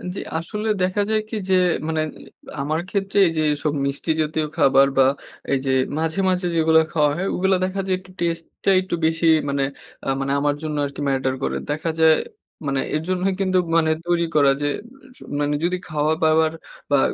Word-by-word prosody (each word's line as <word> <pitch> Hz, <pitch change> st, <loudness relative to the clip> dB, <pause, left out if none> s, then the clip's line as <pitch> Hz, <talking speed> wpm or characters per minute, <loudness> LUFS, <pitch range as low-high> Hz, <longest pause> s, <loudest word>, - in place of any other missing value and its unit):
জি, -, -, -4 dB, 0.2 s
আসলে 210 Hz, +7 st, -4 dB
দেখা 185 Hz, +3 st, +1 dB
যায় 220 Hz, 0 st, +2 dB
কি 225 Hz, -, -4 dB
যে 190 Hz, -, +4 dB, 0.3 s
মানে 160 Hz, -1 st, 0 dB, 0.6 s
আমার 155 Hz, +3 st, -1 dB
ক্ষেত্রে 195 Hz, +1 st, -2 dB
এই -, -, 0 dB
যে -, -, +2 dB
এসব 145 Hz, 0 st, -2 dB
মিষ্টি 140 Hz, +4 st, -2 dB
জাতীয় 155 Hz, 0 st, -1 dB
খাবার 135 Hz, -3 st, +5 dB
বা 135 Hz, -, +6 dB, 0.5 s
এই 135 Hz, -, +3 dB
যে 135 Hz, -, +1 dB, 0.3 s
মাঝে, 160 Hz, +3 st, -1 dB
মাঝে 180 Hz, -1 st, 0 dB
যেগুলো 160 Hz, 0 st, +5 dB
খাওয়া 150 Hz, -2 st, +2 dB
হয়, 190 Hz, -, -1 dB
ওগুলো 190 Hz, +1 st, +2 dB
দেখা 185 Hz, +1 st, -3 dB
যায় 185 Hz, -, +2 dB
একটু 185 Hz, 0 st, -17 dB
টেস্টটা 170 Hz, +2 st, -2 dB
একটু 185 Hz, -2 st, -3 dB
বেশি 165 Hz, +1 st, +1 dB, 0.2 s
মানে 140 Hz, 0 st, 0 dB, 0.4 s
আ -, -, -5 dB
মানে 135 Hz, 0 st, -1 dB
আমার 145 Hz, 0 st, +1 dB
জন্য 155 Hz, -1 st, -3 dB
আরকি 140 Hz, 0 st, -6 dB
ম্যাটার 135 Hz, -1 st, 0 dB
করে। -, -, -1 dB
দেখা 155 Hz, +3 st, -1 dB
যায় 160 Hz, -1 st, +6 dB, 0.5 s
মানে 135 Hz, -1 st, 0 dB
এর 155 Hz, -, 0 dB
জন্যই 185 Hz, +1 st, +1 dB
কিন্তু 185 Hz, -1 st, +2 dB, 0.2 s
মানে 160 Hz, -1 st, +3 dB, 0.2 s
তৈরি 170 Hz, -1 st, +2 dB
করা 140 Hz, -2 st, +5 dB
যে 145 Hz, -, +1 dB, 0.5 s
সু -, -, -13 dB, 0.2 s
মানে 145 Hz, 0 st, 0 dB
যদি 180 Hz, +1 st, +1 dB
খাওয়া-দাওয়ার 155 Hz, +1 st, +2 dB, 0.4 s
বা 140 Hz, -, +5 dB
160 Hz, 185 wpm, -22 LUFS, 145-180 Hz, 0.6 s, বা